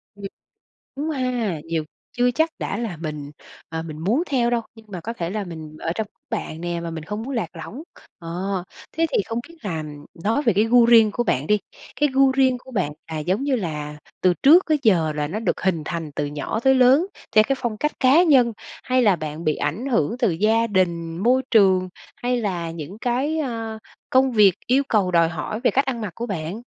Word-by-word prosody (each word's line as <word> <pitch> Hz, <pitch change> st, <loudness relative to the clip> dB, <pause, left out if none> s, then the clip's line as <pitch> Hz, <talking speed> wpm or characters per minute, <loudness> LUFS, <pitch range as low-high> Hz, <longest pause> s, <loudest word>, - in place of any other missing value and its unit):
Ừm, 200 Hz, -1 st, -9 dB, 0.7 s
đúng 305 Hz, +3 st, -2 dB
ha, 245 Hz, -, -1 dB
nhiều 165 Hz, -1 st, -2 dB, 0.3 s
chưa 245 Hz, 0 st, +3 dB
chắc 320 Hz, +5 st, +1 dB
đã -, -, -3 dB
là 225 Hz, -8 st, -4 dB
mình, 150 Hz, -3 st, -6 dB, 0.4 s
ờ, 160 Hz, 0 st, -4 dB
mình 155 Hz, -2 st, -8 dB
muốn 215 Hz, -, +1 dB
theo 240 Hz, -3 st, +2 dB
đâu 240 Hz, -1 st, +1 dB
nhưng 225 Hz, -1 st, -16 dB
mà 185 Hz, -3 st, -6 dB
có 230 Hz, +7 st, -5 dB
thể 170 Hz, -6 st, -4 dB
là 210 Hz, 0 st, -3 dB
mình 160 Hz, -3 st, -9 dB
ở 165 Hz, -, -2 dB
trong 220 Hz, +2 st, -2 dB, 0.2 s
đám 225 Hz, -, 0 dB
bạn 160 Hz, +1 st, -8 dB
nè 175 Hz, -1 st, -3 dB
mà 170 Hz, -, -5 dB
mình 160 Hz, -1 st, -6 dB
không 210 Hz, +6 st, -5 dB
muốn 265 Hz, +3 st, -5 dB
lạc 230 Hz, -, -3 dB
lõng, 260 Hz, +8 st, -8 dB
kh -, -, -18 dB, 0.2 s
ờ, 180 Hz, +2 st, -3 dB, 0.3 s
thế 330 Hz, +1 st, +1 dB
thì -, -, +2 dB
không 230 Hz, +1 st, -3 dB
biết 335 Hz, -, -15 dB
là 165 Hz, -6 st, -3 dB, 0.4 s
nói 225 Hz, +7 st, +1 dB
về 230 Hz, -6 st, +3 dB
cái 205 Hz, +3 st, +3 dB
gu 235 Hz, +1 st, +5 dB
riêng 225 Hz, -2 st, +6 dB
của 240 Hz, -, 0 dB
bạn 140 Hz, -, 0 dB
đi, 210 Hz, +3 st, +3 dB, 0.4 s
cái 295 Hz, -, +4 dB
gu 270 Hz, 0 st, +5 dB
riêng 260 Hz, -2 st, +3 dB
của 260 Hz, -, -15 dB
bạn 185 Hz, -, -1 dB, 0.2 s
là 155 Hz, -, -3 dB
giống 185 Hz, -, -1 dB
như 275 Hz, -3 st, +1 dB
là 150 Hz, -6 st, -4 dB, 0.2 s
từ 180 Hz, -1 st, +3 dB
trước 330 Hz, +7 st, +7 dB
tới 310 Hz, -1 st, +3 dB
giờ 170 Hz, -9 st, +3 dB
là 150 Hz, 0 st, -2 dB
nó 200 Hz, +7 st, -3 dB
được 225 Hz, -, -1 dB
hình 185 Hz, -4 st, 0 dB
thành 160 Hz, -1 st, -4 dB
từ 145 Hz, -, -2 dB
nhỏ 145 Hz, +9 st, -3 dB
tới 265 Hz, +2 st, +4 dB
lớn 260 Hz, +6 st, +5 dB, 0.3 s
theo 215 Hz, -, +8 dB
cái 275 Hz, -, +1 dB
phong 235 Hz, -4 st, -2 dB
cách 300 Hz, +7 st, -1 dB
cá 275 Hz, +6 st, +6 dB
nhân 260 Hz, -8 st, +4 dB, 0.3 s
hay 255 Hz, 0 st, +2 dB
là 200 Hz, -5 st, +4 dB
bạn 155 Hz, +1 st, -6 dB
bị 155 Hz, -1 st, +1 dB
ảnh 165 Hz, -, -2 dB
hưởng 230 Hz, -, +1 dB
từ 240 Hz, -7 st, +2 dB
gia 220 Hz, +7 st, +2 dB
đình, 170 Hz, -5 st, 0 dB
môi 250 Hz, +6 st, +3 dB
trường 190 Hz, -4 st, +4 dB, 0.3 s
hay 250 Hz, 0 st, +1 dB
là 175 Hz, -6 st, -2 dB
những 165 Hz, +5 st, -8 dB
cái, 260 Hz, +7 st, 0 dB
ơ, 225 Hz, -6 st, -3 dB, 0.3 s
công 260 Hz, 0 st, +4 dB
việc 205 Hz, -5 st, +6 dB
yêu 260 Hz, +3 st, +3 dB
cầu 200 Hz, -5 st, +2 dB
đòi 170 Hz, -2 st, +4 dB
hỏi 170 Hz, +7 st, -4 dB
về 250 Hz, -, +3 dB
cách 275 Hz, -, +2 dB
ăn 245 Hz, -4 st, -3 dB
mặc 210 Hz, -5 st, -4 dB
của 235 Hz, -, -4 dB
bạn? 190 Hz, +1 st, -4 dB
215 Hz, 230 wpm, -22 LUFS, 170-250 Hz, 0.7 s, theo